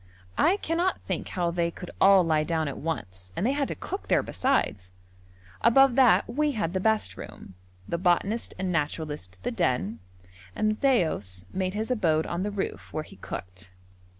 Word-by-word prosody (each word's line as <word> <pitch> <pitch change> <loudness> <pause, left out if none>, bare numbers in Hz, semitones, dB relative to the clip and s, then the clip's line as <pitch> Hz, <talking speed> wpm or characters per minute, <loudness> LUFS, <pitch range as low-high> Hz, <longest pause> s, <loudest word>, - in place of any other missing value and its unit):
I 375 +4 +4
cannot 350 0 0
think - - -3
how 175 -2 -1
they 170 0 0
could 180 +1 -9
all 195 -1 +7
lie 155 -2 +2
down 160 -1 0
at 140 - -5
once, 95 - -5
and 190 - -1
they 255 - +3
had 280 -1 0
to - - -4
cook 385 +3 -6
there - - +3
besides. 105 - 0 0.7
Above 265 +3 +6
that, 255 -1 +5
we 295 +5 0
had 185 -7 -2
the 190 - 0
best 220 +2 +1
room, 95 - -10 0.3
the 170 - -2
botanist 195 +5 +1
and 185 0 -2
naturalist 150 - -3
the - - -1
den, 115 -2 0 0.6
and 215 - +1
Matthaios 155 - +1
made 185 0 -1
his 220 +4 -2
abode 160 -9 +2
on 170 +1 -3
the 205 - -1
roof, 200 -1 -4
where 155 - -3
he 155 - -15
cooked. 90 0 -8
180 Hz, 180 wpm, -27 LUFS, 150-230 Hz, 0.7 s, all